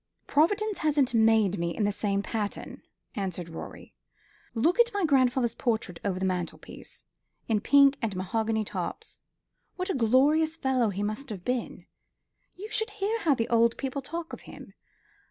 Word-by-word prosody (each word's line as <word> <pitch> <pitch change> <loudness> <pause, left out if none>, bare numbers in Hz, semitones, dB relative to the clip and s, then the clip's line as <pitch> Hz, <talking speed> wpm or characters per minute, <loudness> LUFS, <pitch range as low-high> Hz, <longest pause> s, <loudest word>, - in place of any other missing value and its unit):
"Providence 410 +7 +1
hasn't 290 -5 +2
made 220 -4 +4
me 170 0 -2
in 215 - +1
the 205 - +2
same 200 -1 -1
pattern," 210 -2 -4 0.3
answered 185 -4 -4
Rorie. 165 - -9 0.6
"Look 325 - +2
at 475 0 +5
my 400 -3 +2
grandfather's 260 -4 +3
portrait 220 -9 -2
over 195 -2 -1
the 190 - -1
mantelpiece, 180 -2 -5 0.4
in 215 -3 +1
pink 280 +2 +5
and 220 -5 -2
mahogany 220 +3 -1
tops. 195 - -6 0.6
What 365 +1 -2
a - - 0
glorious 285 +7 +3
fellow 260 -6 +1
he 200 +1 -3
must 215 +6 -4
have 195 -5 -7
been. 250 -1 -3 0.7
You 420 +4 -9
should 440 +1 0
hear 425 +2 -2
how 320 -9 +3
the 230 -2 -1
old 235 0 +3
people 275 +1 -3
talk 330 +5 -6
of - - -7
him. - - -12
235 Hz, 160 wpm, -28 LUFS, 205-310 Hz, 0.7 s, at